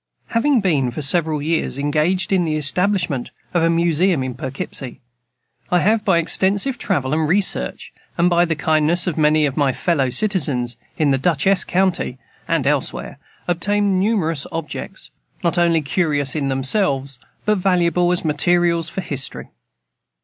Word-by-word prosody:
Having 240 +2 +2
been, 150 -10 +1
for 145 +5 -5
several 155 0 +2
years, 160 -3 -1
engaged 155 +7 0
in 185 -2 +3
the 155 -2 -1
establishment 170 -2 0 0.2
of 175 - +2
a 165 - +3
Museum 170 -1 +2
in 130 -1 -4
Poughkeepsie, 130 0 -4 0.7
I 180 - +3
have, 215 +2 +2
by 190 -6 +3
extensive 195 +9 +1
travel 130 -1 -1
and 155 0 +1
research, 180 - -1 0.2
and 170 - +3
by 175 0 +3
the 165 -2 -1
kindness 155 +3 +2
of 180 -5 -2
many 155 0 +3
of 140 -2 -3
my 140 -3 +2
fellow 140 -6 0
citizens 135 - 0 0.2
in 150 -3 +2
Dutchess 170 +7 +2
county 180 -8 0 0.3
and 165 -5 0
elsewhere, 140 -1 -2 0.3
obtained 200 +2 +1
numerous 180 -8 0
objects, 165 -2 -7 0.3
not 170 +1 +1
only 170 -2 +3
curious 145 -3 0
in 140 -3 -1
themselves, 135 - 0 0.3
but 210 -2 +1
valuable 180 -1 +2
as 180 -1 0
materials 170 +2 +1
for 190 - -4
history. 140 -6 -4
165 Hz, 150 wpm, -19 LUFS, 145-180 Hz, 0.7 s, in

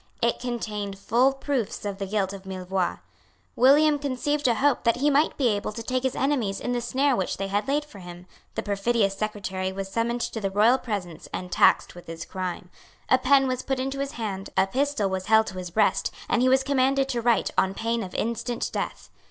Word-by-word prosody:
It 235 0 +1
contained 210 -5 -4
full 240 +7 +3
proofs 270 -6 -3
of 200 -1 -4
the 195 - -3
guilt 195 -1 -1
of 195 -1 -9
Millevoix. 185 -1 -2 0.5
William 290 +4 +5
conceived 290 +1 -1
a 235 - +3
hope 280 +3 +2
that 230 -1 +3
he 285 +4 +2
might 290 +3 +2
be 260 -4 +3
able 205 -1 -1
to 230 - -6
take 255 +2 -1
his 260 0 -1
enemies 250 -8 0
in 245 - -3
the 245 -1 0
snare 265 +3 +1
which 190 -4 -2
they 195 - -2
had 205 +5 -1
laid 295 +2 0
for 220 -9 -13
him. 175 0 -10 0.3
The - - -2
perfidious 200 0 +1
secretary 195 -3 -3
was 195 0 -5
summoned 235 +2 -1
to 225 - -3
the 195 - 0
royal 220 +6 +4
presence 180 -8 -5
and 180 -1 -5
taxed - - +4
with 175 - -13
his 165 0 -6
crime. 180 -1 -5 0.4
A 260 - +5
pen 270 +1 +4
was 255 -1 -1
put 270 -1 -2
into 270 +1 -3
his 275 0 -3
hand; 200 -4 -4
a - - +5
pistol 265 0 0
was 190 -1 -3
held 220 0 +5
to 185 -1 -6
his 180 -1 -6
breast; 215 +6 +2 0.2
and 240 - +2
he 255 - +4
was 265 +1 +4
commanded 270 0 +2
to 240 -3 -1
write 235 -2 +2
on 190 0 +2
pain 230 +1 -1
of 185 -3 -7
instant 235 +1 -2
death. - - -4
230 Hz, 220 wpm, -25 LUFS, 195-260 Hz, 0.5 s, William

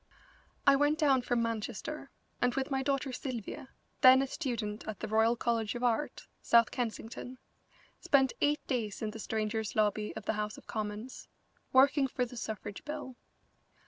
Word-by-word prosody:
I 275 - +7
went 290 +2 +3
down 280 -5 +4
from 240 -1 0
Manchester, 230 +6 -4 0.3
and 245 0 +2
with 270 +1 -2
my 270 0 +1
daughter 275 0 0
Sylvia, 250 -1 -5 0.3
then 260 +1 +8
a - - 0
student 235 -7 -3
at 215 -2 -5
the - - -4
Royal 220 +2 +3
College 230 -1 -1
of 240 - -4
Art, 245 +4 0 0.2
South 235 -1 +5
Kensington, 240 +1 -4 0.6
spent 270 -3 +3
eight 295 +1 +2
days 225 -6 -2
in 215 - -1
the 225 - -9
Strangers' 220 0 -2
Lobby 210 0 +1
of 220 - -7
the - - +1
House 210 0 -3
of - - -14
Commons, 215 +3 -5 0.4
working 275 +1 +5
for 250 -1 -1
the 245 - -10
suffrage 215 -3 -5
bill. 295 -4 -6
240 Hz, 165 wpm, -32 LUFS, 220-270 Hz, 0.6 s, then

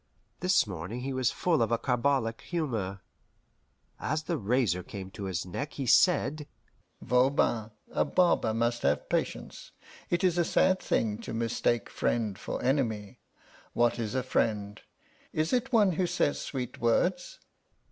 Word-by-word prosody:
This 185 -6 +3
morning 95 +4 -5
he 135 +1 -3
was 130 -2 +1
full 165 -7 +1
of 115 - +1
a 115 - +3
carbolic 125 -2 0
humour. 115 - -3 1.0
As 155 +1 -1
the 170 - -1
razor 110 -4 +1
came 95 +1 -8
to 100 -1 -6
his 95 -2 -2
neck 140 +11 -5
he 135 - -4
said: 150 0 +3 0.6
"Voban, 125 -3 +2 0.2
a - - +2
barber 175 -11 +2
must 120 +1 0
have 70 +1 0
patience. - - -3 0.4
It 175 +1 0
is 175 -2 +3
a - - +4
sad 185 +3 +3
thing 105 -2 0
to - - -6
mistake 115 0 0
friend 110 -4 -1
for - - -4
enemy. 115 -7 -1 0.5
What 120 0 +2
is 115 +1 -3
a 130 - +1
friend? 105 -5 -1 0.5
Is 155 +5 0
it 250 +1 +1
one 210 -5 +5
who 180 +2 0
says 175 -4 0
sweet 125 -3 -5
words?" - - +1
125 Hz, 150 wpm, -29 LUFS, 110-155 Hz, 1.0 s, one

